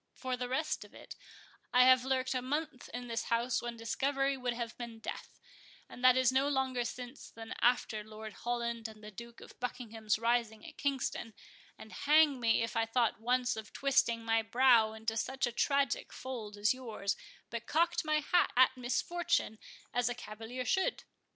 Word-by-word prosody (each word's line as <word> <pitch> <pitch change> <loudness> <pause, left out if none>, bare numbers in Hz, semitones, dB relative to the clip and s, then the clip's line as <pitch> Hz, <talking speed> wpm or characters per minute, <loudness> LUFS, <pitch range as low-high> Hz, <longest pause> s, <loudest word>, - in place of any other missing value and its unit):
For 255 -1 -3
the 250 0 -4
rest 300 +5 -1
of - - -17
it, - - -10 0.6
I 250 0 +6
have 255 -1 +6
lurked 260 0 0
a 255 - -1
month 290 +1 -3
in 245 0 -5
this 230 -1 -2
house 235 +1 +1
when 240 -1 -5
discovery 275 +4 0
would 250 -2 -2
have 235 -2 -4
been 235 -2 -7
death, 225 - -7 0.5
and 245 - -11
that 255 0 +7
is 260 -1 +4
no 265 +2 +2
longer 260 -3 0
since 245 +3 -7
than 225 0 -8
after 235 -3 +2
Lord 215 0 -9
Holland 235 -1 -3
and 215 -1 -13
the 210 - -8
Duke 235 +3 -11
of - - -14
Buckingham's 225 -4 -2
rising 230 -1 0
at - - -10
Kingston; 265 -5 -2 0.4
and 220 - -12
hang 295 -2 +4
me, 230 -1 +3
if 230 - -4
I 225 0 +1
thought 230 -1 +1
once 250 +1 +1
of 220 -1 -8
twisting 235 -4 +2
my 225 0 +3
brow 230 -1 +4
into 220 0 -3
such 265 +4 -1
a 240 - -2
tragic 275 +2 +1
fold 225 -6 -6
as 205 +3 +3
yours, 220 -6 -3 0.4
but 235 0 -5
cocked 335 +3 +2
my 305 0 +1
hat 350 +4 +3
at 260 0 +6
misfortune 255 -1 0 0.3
as 245 0 +2
a 245 - -3
cavalier 225 +3 -6
should." 380 - +1
245 Hz, 185 wpm, -33 LUFS, 225-260 Hz, 0.6 s, that